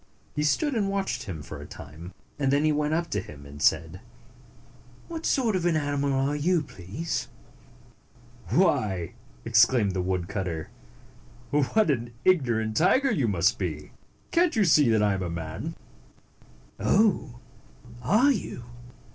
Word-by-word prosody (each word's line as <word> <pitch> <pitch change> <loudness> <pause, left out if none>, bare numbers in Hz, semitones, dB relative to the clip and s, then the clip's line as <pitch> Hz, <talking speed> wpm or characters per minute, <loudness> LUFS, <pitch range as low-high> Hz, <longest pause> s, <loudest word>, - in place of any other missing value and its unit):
He 150 - -2
stood 285 - +1
and 205 -5 0
watched 195 -1 -2
him 85 -7 -6
for - - -8
a - - -9
time, 80 +5 -10 0.3
and 135 -2 +1
then 140 +2 +3
he 155 - +4
went 150 +1 0
up 170 +1 -1
to 105 - 0
him, 70 -6 -12
and 70 +1 -11
said, - - +1 1.1
"What 330 -1 -4
sort 235 -7 +1
of 180 - -1
an 175 -2 +2
animal 145 -1 -1
are 135 +2 +1
you, 165 +2 +1
please?" 105 - -5 0.6
" 120 -2 -26
Why," 110 - +1 0.3
exclaimed 115 -2 +4
the 95 -1 -2
woodcutter, 90 -2 -3 0.4
" 120 - -25
what 150 +7 +2
an 120 -3 -3
ignorant 120 -11 +2
tiger 260 - +3
you 140 - +1
must 95 -6 +2
be! 75 -6 -4 0.4
Cant 340 -1 +2
you 215 - +3
see 150 -6 +5
that 110 -2 +3
I 105 -1 +3
am 95 - -3
a 90 - -3
man?" 80 -1 -5 1.0
"Oh! 190 - +2 0.6
Are 215 - +4
you? 190 - -4
130 Hz, 155 wpm, -26 LUFS, -, 1.1 s, see